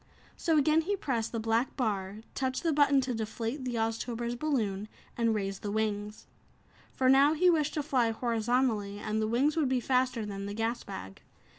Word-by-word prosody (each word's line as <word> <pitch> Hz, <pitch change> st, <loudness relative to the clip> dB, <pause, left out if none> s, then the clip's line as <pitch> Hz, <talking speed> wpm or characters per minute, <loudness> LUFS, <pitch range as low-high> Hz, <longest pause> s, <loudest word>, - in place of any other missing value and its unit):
So 325 Hz, -2 st, +1 dB
again 305 Hz, +2 st, +4 dB
he 400 Hz, +5 st, -1 dB
pressed 240 Hz, -, -2 dB
the 230 Hz, -, -2 dB
black 225 Hz, +3 st, 0 dB
bar, 205 Hz, -4 st, -2 dB
touched 260 Hz, +2 st, -2 dB
the 330 Hz, -2 st, +2 dB
button 285 Hz, -2 st, +4 dB
to 255 Hz, -1 st, -2 dB
deflate 225 Hz, +4 st, -4 dB
the 245 Hz, -1 st, -2 dB
Oztober's 230 Hz, +1 st, -2 dB
balloon 225 Hz, -8 st, -1 dB, 0.3 s
and 230 Hz, -2 st, +1 dB
raise 195 Hz, -2 st, -3 dB
the 205 Hz, -, -5 dB
wings. 210 Hz, 0 st, -2 dB, 0.7 s
For 260 Hz, -, 0 dB
now 275 Hz, +3 st, +6 dB
he 360 Hz, +3 st, +5 dB
wished 305 Hz, -3 st, 0 dB
to 300 Hz, -, -1 dB
fly 255 Hz, -6 st, +2 dB
horizontally, 225 Hz, -2 st, 0 dB
and 215 Hz, +1 st, -2 dB
the 215 Hz, -, 0 dB
wings 260 Hz, +7 st, +2 dB
would 305 Hz, -5 st, +1 dB
be 260 Hz, -1 st, +2 dB
faster 250 Hz, -2 st, +1 dB
than 200 Hz, -1 st, -5 dB
the 205 Hz, -, -5 dB
gas 225 Hz, +2 st, -1 dB
bag. 190 Hz, -, -8 dB
235 Hz, 185 wpm, -30 LUFS, 215-270 Hz, 0.7 s, now